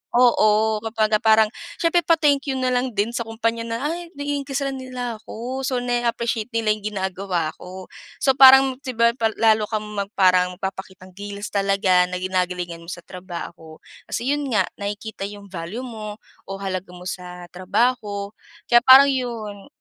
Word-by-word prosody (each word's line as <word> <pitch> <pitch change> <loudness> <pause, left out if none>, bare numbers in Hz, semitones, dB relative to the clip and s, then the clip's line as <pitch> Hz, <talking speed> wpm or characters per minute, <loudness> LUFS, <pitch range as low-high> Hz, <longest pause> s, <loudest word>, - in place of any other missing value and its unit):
oo, 220 -3 +4
kumbaga 220 -1 0
parang 220 -1 +4 0.2
siyempre 340 0 +2
pa-thank 300 -4 +2
you 270 - -1
na 255 -1 0
lang 250 -2 -1
din 210 +3 0
sa 235 -1 -4
kumpanya 230 +1 -2
na, 230 0 -2
"Ay 345 +1 -6
nai-increase'an 280 -1 -3
nila 250 -3 -5
ako." 245 +4 -6
So, 250 -2 -1
na-appreciate 235 -2 -1
nila 225 -2 +2
'yong 210 0 -3
ginagawa 190 -4 -2
ko. 185 0 -10 0.3
So 270 - +5
parang, 265 0 +7
'di 260 -3 -6
ba, 235 +1 +4
pal 225 -2 -1
lalo 220 -1 +3
kang 215 -1 -2 0.3
parang 180 -1 +3
magpapakitang 190 0 -7
gilas 205 +2 -7
talaga, 195 -2 +2
na 180 - -5
ginagalingan 180 -2 -2
mo 170 - -15
sa 175 - -8
trabaho. 170 -3 -9 0.3
Kasi 255 +4 -2
'yon 290 -1 -1
nga, 200 - +4 0.2
nakikita 205 0 -5
'yong 200 -1 -11
value 185 +7 -6
mo 215 -4 -7 0.3
o - - -7
halaga 185 -1 -4
mo 180 - -11
sa 180 -1 -7
trabaho. 205 +1 -1 0.4
Kaya 240 - +8
parang 275 +2 +9
'yon. 225 -6 -4
215 Hz, 160 wpm, -22 LUFS, 190-245 Hz, 0.4 s, parang